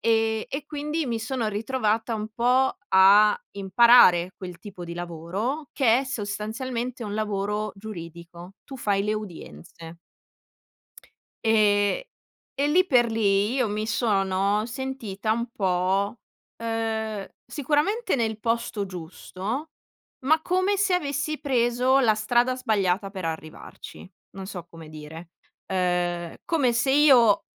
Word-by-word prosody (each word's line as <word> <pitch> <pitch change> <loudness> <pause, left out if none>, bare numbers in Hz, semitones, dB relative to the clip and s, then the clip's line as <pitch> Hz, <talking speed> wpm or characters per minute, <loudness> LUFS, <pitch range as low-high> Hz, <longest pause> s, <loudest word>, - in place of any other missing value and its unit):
Ehm, 225 -1 +1
e 275 +2 -4
quindi 300 0 -3
mi 230 -2 -2
sono 225 0 -2
ritrovata 225 +1 -1
un 215 0 -4
po' 250 +3 +2
a 200 +3 +6
imparare 195 -3 +5
quel 180 -2 -8
tipo 190 -4 -9
di 170 - -7
lavoro 175 - -4
che 245 -3 +3
è 275 - -4
sostanzialmente 235 +2 -4
un 205 0 -5
lavoro 210 0 -2
giuridico, 175 -2 -10
tu 270 - -9
fai 200 -4 0
le 210 +1 0
udienze. 165 - -9 1.5
Ehm, 210 - +3 0.6
e 285 +1 +2
lì 365 +5 +4
per 240 -5 +3
lì, 205 0 +2
io 250 -5 +1
mi 215 +1 -3
sono 200 -2 +1
sentita 230 -5 -3
un 235 +1 -2
po', 190 +3 0 0.4
uhm, 220 -2 -3 0.2
sicuramente 310 - 0
nel 220 -2 -1
posto 230 -3 -1
giusto, 190 - -6 0.5
ma 315 +3 +4
come 370 +3 +1
se 390 -2 +2
avessi 300 -2 -2
preso 250 0 +2
la 225 -5 +4
strada 240 +4 +1
sbagliata, 200 -5 0
per 185 -4 -5
arrivarci, 160 +3 -8 0.2
non 195 -1 -8
so 180 -4 -7
come 165 -2 -12
dire, 155 +2 -10 0.4
uhm, 175 -2 -1
come 285 -8 +2
se 235 +3 +1
io 260 -8 +5
215 Hz, 125 wpm, -25 LUFS, 195-255 Hz, 1.5 s, a